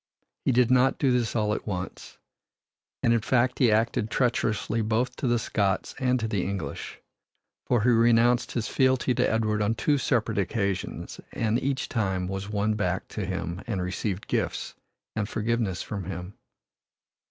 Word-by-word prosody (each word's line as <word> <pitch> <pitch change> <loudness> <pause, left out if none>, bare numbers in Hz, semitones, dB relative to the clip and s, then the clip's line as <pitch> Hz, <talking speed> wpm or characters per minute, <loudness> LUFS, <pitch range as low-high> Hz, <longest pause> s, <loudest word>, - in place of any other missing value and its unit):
He - - +4
did 125 0 +3
not 130 +1 +4
do 135 - +2
this 120 -3 +1
all 105 -2 +1
at - - -5
once, 90 -3 -5 0.9
and, 115 - +4
in 115 - +2
fact, 125 +2 +1
he 120 -4 +5
acted 110 0 +1
treacherously 115 -2 0
both 110 +3 0
to 140 - -1
the 120 0 +3
Scots 100 -3 0
and 125 -1 +2
to 110 - -1
the 100 -4 0
English 95 -8 -5 0.7
for 120 -4 +2
he 125 - +4
renounced 120 +1 +4
his 115 -1 -1
fealty 130 -1 +2
to - - +2
Edward 110 -1 +1
on 105 +2 +1
two 145 +4 +1
separate 115 -5 +1
occasions, 100 -1 -2
and 115 +1 0
each 135 0 -1
time 95 -5 -1
was 95 +1 -4
won 105 +1 +1
back 95 -3 -1
to 105 - -4
him 90 -1 -3
and 105 -5 -1
received 95 +2 -3
gifts - - -2 0.4
and 105 0 -1
forgiveness 110 -4 -1
from 100 -4 -5
him. 90 +1 -6
110 Hz, 165 wpm, -27 LUFS, 100-120 Hz, 0.9 s, he